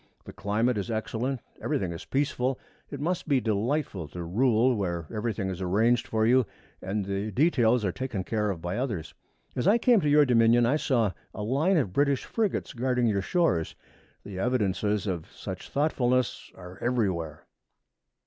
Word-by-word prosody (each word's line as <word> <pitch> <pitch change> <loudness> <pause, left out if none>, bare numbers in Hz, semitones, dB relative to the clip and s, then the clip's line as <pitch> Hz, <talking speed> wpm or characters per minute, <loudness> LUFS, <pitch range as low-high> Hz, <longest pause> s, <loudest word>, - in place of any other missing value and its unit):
The - - -9
climate 110 +3 0
is 100 - -4
excellent. 115 +3 -2 0.2
Everything 90 -3 -1
is 85 - -7
peaceful. 135 -2 0 0.3
It 140 - -6
must 170 +4 -2
be 140 -4 +3
delightful 110 - -1
to 85 +4 -7
rule 120 +6 +2
where 85 -5 -2
everything 110 -2 -2
is 95 0 -6
arranged 110 +6 +2
for 110 0 +1
you 125 -1 +4 0.3
and 100 +2 -2
the 100 +2 -2
details 125 - +3
are 95 - +1
taken 125 -4 -4
care 105 +1 -1
of 85 -4 -4
by 90 +4 -2
others. 100 - -3 0.4
As 125 - 0
I 210 +4 +6
came 235 -3 +4
to 150 - +1
your 150 0 +6
dominion 120 -1 +4
I 135 +6 +2
saw 120 -9 +1 0.2
a 105 - -4
line 145 - +2
of 105 - 0
British 140 +1 +1
frigates 220 -4 -1
guarding 125 0 0
your 100 -4 +1
shores. 95 - 0 0.5
The 100 -2 -7
evidences 105 -3 0
of 90 -3 -4
such 95 -2 -7
thoughtfulness 130 -4 0
are 90 0 -11
everywhere.' 95 -11 -1
115 Hz, 170 wpm, -27 LUFS, 95-130 Hz, 0.5 s, I